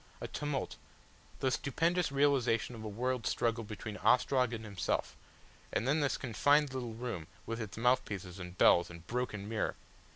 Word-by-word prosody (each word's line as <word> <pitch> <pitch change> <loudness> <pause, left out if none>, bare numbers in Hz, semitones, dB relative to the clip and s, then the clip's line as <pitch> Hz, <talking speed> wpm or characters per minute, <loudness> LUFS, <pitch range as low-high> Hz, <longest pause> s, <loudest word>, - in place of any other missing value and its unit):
A - - -4
tumult, 145 -3 -3 0.6
the 130 - +2
stupendous 165 +5 +1
realisation 135 -5 +2
of 110 -2 -8
a - - -4
world 125 +3 -1
struggle 115 0 0
between 105 0 -6
Ostrog 125 -1 +3
and 110 -2 -5
himself, 100 -6 -2 0.6
and 115 - 0
then 145 +4 +3
this 145 -2 +1
confined 145 +4 +3
quiet 130 0 -3
little 115 -2 -5
room 115 -9 -4 0.2
with 115 +1 -3
its 110 -2 -6
mouthpieces 105 -7 0
and 90 0 -8
bells 85 0 +6
and 85 -1 -11
broken 120 -5 -3
mirror! 110 0 -1
120 Hz, 165 wpm, -33 LUFS, 105-130 Hz, 0.6 s, bells